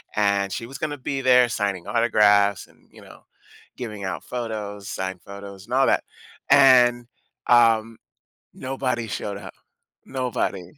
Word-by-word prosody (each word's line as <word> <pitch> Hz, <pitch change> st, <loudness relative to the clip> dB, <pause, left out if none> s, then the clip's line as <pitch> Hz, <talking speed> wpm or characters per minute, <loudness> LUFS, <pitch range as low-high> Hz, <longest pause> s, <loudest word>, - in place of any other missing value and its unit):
and 100 Hz, -2 st, +1 dB
she 115 Hz, -, -4 dB
was 135 Hz, +2 st, -9 dB
gonna 150 Hz, -1 st, -3 dB
be 135 Hz, +1 st, -4 dB
there 125 Hz, -1 st, +5 dB
signing 100 Hz, -5 st, -3 dB
autographs 105 Hz, -4 st, +3 dB
and, -, -, -27 dB
you -, -, -16 dB
know, -, -, -15 dB, 0.6 s
giving 105 Hz, -5 st, -7 dB
out 85 Hz, -5 st, -4 dB
photos, 105 Hz, -4 st, -6 dB
signed 95 Hz, -2 st, -5 dB
photos 100 Hz, -1 st, -11 dB
and 120 Hz, -, -8 dB
all 135 Hz, 0 st, +4 dB
that, -, -, +2 dB, 0.5 s
and, 125 Hz, -3 st, +6 dB, 0.4 s
um, 115 Hz, -2 st, +4 dB, 0.6 s
nobody 130 Hz, -3 st, -3 dB
showed 100 Hz, -1 st, -5 dB
up, 100 Hz, -, -10 dB, 0.5 s
nobody. 125 Hz, -8 st, -3 dB
115 Hz, 140 wpm, -23 LUFS, 100-125 Hz, 0.6 s, and